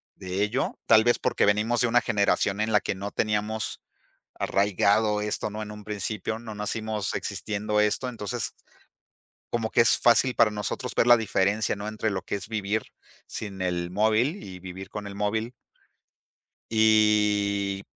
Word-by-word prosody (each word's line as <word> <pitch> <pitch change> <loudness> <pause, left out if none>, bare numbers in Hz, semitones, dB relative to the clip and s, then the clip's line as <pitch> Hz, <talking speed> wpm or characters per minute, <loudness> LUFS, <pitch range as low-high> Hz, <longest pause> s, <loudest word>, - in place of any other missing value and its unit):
de 95 +2 -2
ello, 120 +6 -1
tal 110 -1 +6
vez 120 - +4
porque - - +1
venimos 105 +4 +2
de 125 - +3
una 120 +1 +3
generación 100 0 +1
en 110 +1 0
la - - +4
que - - -2
no 100 +1 -6
teníamos 105 0 -1 0.6
arraigado 105 +2 +2
esto, 105 0 -2
¿no? 105 +1 -6
En 105 0 -6
un 105 0 -10
principio 105 +1 -3
no 110 -2 -8
nacimos 105 -1 -3
existiendo 105 +1 -2
esto, 105 +4 +1
entonces 105 -5 -4 1.0
como 115 -2 -1
que - - +4
es 115 - +5
fácil 120 +2 +4
para 110 - +5
nosotros 105 -2 -4
ver - - +3
la 120 0 +8
diferencia, 105 -1 0
¿no?, 100 +1 -6
entre 110 0 -2
lo 95 -2 -3
que - - -7
es 100 +2 -6
vivir 110 0 -1 0.4
sin 100 -3 -6
el 90 -1 -2
móvil 110 - +1
y 90 -2 -9
vivir 95 +1 -9
con 105 -1 -6
el 100 - -7
móvil. 110 +3 -1 1.2
Y, 105 -2 +3
105 Hz, 165 wpm, -26 LUFS, 100-110 Hz, 1.2 s, la